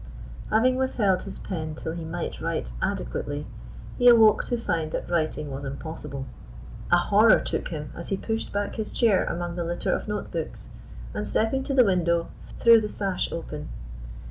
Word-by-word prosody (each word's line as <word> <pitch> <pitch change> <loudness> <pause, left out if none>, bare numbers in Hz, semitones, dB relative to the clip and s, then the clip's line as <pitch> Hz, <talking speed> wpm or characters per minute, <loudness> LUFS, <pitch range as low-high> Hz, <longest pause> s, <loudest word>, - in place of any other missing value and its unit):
Having 255 +4 +3
withheld 210 -8 +1
his 195 - -7
pen 155 -5 -5
till 160 - -5
he 165 0 -5
might 165 +1 -5
write - - -2
adequately, - - -2 0.5
he 245 - +5
awoke 225 -3 +7
to 240 - -1
find 165 -8 -2
that - - -3
writing 155 -3 -1
was 135 +1 -5
impossible. 140 -1 -6 0.7
A 175 - +7
horror 210 +5 +5
took - - -2
him 150 -3 -6
as 170 - -6
he 195 - 0
pushed 225 +3 -3
back 205 0 -2
his 220 -1 -3
chair 220 -6 +3
among 175 0 -3
the 175 - -2
litter 170 +1 -1
of - - -3
note 210 -1 -4
books, 115 - -5 0.4
and, 105 - -2
stepping 225 - +1
to 275 - -1
the 250 -3 +7
window, 170 -3 +1 0.3
threw 230 -1 +7
the 210 - -3
sash 195 -3 -1
open. 150 -3 -6
175 Hz, 175 wpm, -26 LUFS, 155-220 Hz, 0.7 s, awoke